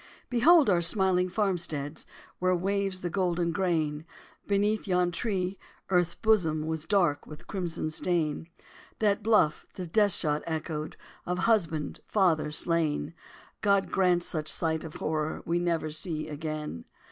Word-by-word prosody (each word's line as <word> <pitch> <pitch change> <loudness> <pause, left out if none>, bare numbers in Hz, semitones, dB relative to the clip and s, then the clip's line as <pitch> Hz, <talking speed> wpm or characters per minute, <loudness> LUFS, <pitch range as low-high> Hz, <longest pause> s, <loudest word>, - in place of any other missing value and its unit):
Behold 300 +6 +6
our 180 -4 +3
smiling 185 0 +3
farmsteads 170 -7 -2 0.3
Where 185 0 +2
waves 195 +1 -1
the 175 - -2
golden 175 -2 0
grain! 160 -4 -1 0.4
Beneath 205 +2 +1
yon 180 -1 +2
tree, 190 -1 -2 0.3
earth's 175 -2 +2
bosom 165 -9 +1
Was 160 -1 -3
dark 175 -8 +1
with 150 - -11
crimson 170 -4 -3
stain. 165 -1 -1 0.5
That 210 -1 +1
bluff 210 -8 +2
the 185 - -5
death 205 +3 +3
shot 150 -1 +1
echoed 155 -1 -4 0.3
Of 180 0 -1
husband, 175 -8 0
father, 175 -7 +2
slain! 160 0 0 0.5
God 200 -2 +2
grant 180 -2 +2
such 155 -3 0
sight 160 -1 +1
of 160 -2 -9
horror 155 0 -2
We 170 +1 0
never 165 -3 -1
see 155 0 -2
again! 150 - -5
175 Hz, 135 wpm, -28 LUFS, 155-195 Hz, 0.5 s, Behold